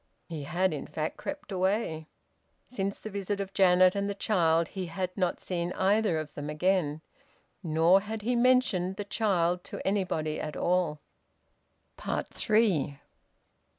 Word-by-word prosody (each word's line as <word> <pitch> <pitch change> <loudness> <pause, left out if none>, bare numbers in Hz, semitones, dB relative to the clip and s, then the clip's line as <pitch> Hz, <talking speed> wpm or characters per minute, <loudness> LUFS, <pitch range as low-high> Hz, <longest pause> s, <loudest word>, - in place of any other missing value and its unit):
He 155 -4 -6
had 175 +3 +1
in 150 - -5
fact 155 +1 -3
crept 290 -3 -6
away. 185 -4 -1 0.6
Since 200 -5 -3
the 215 - -8
visit 200 0 -3
of 195 -1 -4
Janet 185 -1 +5
and 200 0 -1
the 200 - -3
child 170 -5 +2
he 185 -2 -5
had 180 +2 -4
not 180 -3 0
seen 175 -1 -3
either 200 -2 +2
of 155 -2 -5
them 145 0 -5
again, 155 -1 0 0.6
nor 165 +2 +4
had 215 +1 -6
he 245 +3 +1
mentioned 240 -7 +3
the 205 - -5
child 180 -5 +1
to - - -6
anybody 180 -6 -1
at 150 -1 -5
all. 175 -4 0 1.0
THREE. 200 -11 0
185 Hz, 145 wpm, -29 LUFS, 165-200 Hz, 1.0 s, Janet